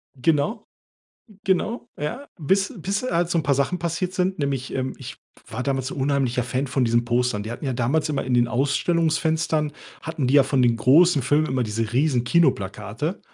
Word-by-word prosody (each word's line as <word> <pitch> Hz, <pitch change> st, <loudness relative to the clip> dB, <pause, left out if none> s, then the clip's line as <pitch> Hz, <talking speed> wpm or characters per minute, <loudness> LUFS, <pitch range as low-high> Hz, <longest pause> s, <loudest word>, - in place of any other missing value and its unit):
Genau, 150 Hz, -, 0 dB, 0.8 s
genau, 220 Hz, +6 st, 0 dB
ja. 240 Hz, -, -4 dB
Bis 195 Hz, -, +1 dB
bis 195 Hz, +6 st, -2 dB
halt 175 Hz, -8 st, 0 dB
so 170 Hz, -, +2 dB
'n -, -, 0 dB
paar 140 Hz, -, +2 dB
Sachen 140 Hz, +7 st, 0 dB
passiert 170 Hz, +2 st, -2 dB
sind, 185 Hz, 0 st, 0 dB
nämlich, 135 Hz, -3 st, -2 dB
ähm, 130 Hz, 0 st, -2 dB
ich -, -, -8 dB, 0.3 s
war 125 Hz, +3 st, -4 dB
damals 135 Hz, -1 st, -2 dB
unheimlicher 135 Hz, -3 st, 0 dB
Fan 130 Hz, +3 st, -2 dB
von 130 Hz, -1 st, 0 dB
diesen 120 Hz, 0 st, +2 dB
Postern. 120 Hz, -3 st, 0 dB
Die 110 Hz, -, -6 dB
hatten 120 Hz, +5 st, -7 dB
ja 130 Hz, -, -1 dB
damals 135 Hz, +6 st, 0 dB
immer 140 Hz, -3 st, -1 dB
in 130 Hz, -1 st, -1 dB
den 120 Hz, -1 st, +3 dB
Ausstellungsfenstern 155 Hz, +2 st, +1 dB, 0.3 s
hatten 160 Hz, -5 st, -3 dB
die 135 Hz, -, +1 dB
ja 140 Hz, -, +8 dB
von 130 Hz, -2 st, +1 dB
den 120 Hz, -1 st, +3 dB
großen 145 Hz, +5 st, +5 dB
Filmen 150 Hz, +4 st, +2 dB
immer 130 Hz, -1 st, 0 dB
diese 110 Hz, +1 st, -3 dB
riesen 130 Hz, -2 st, +2 dB
Kinoplakate. 115 Hz, -, 0 dB
140 Hz, 185 wpm, -23 LUFS, 125-165 Hz, 0.8 s, ja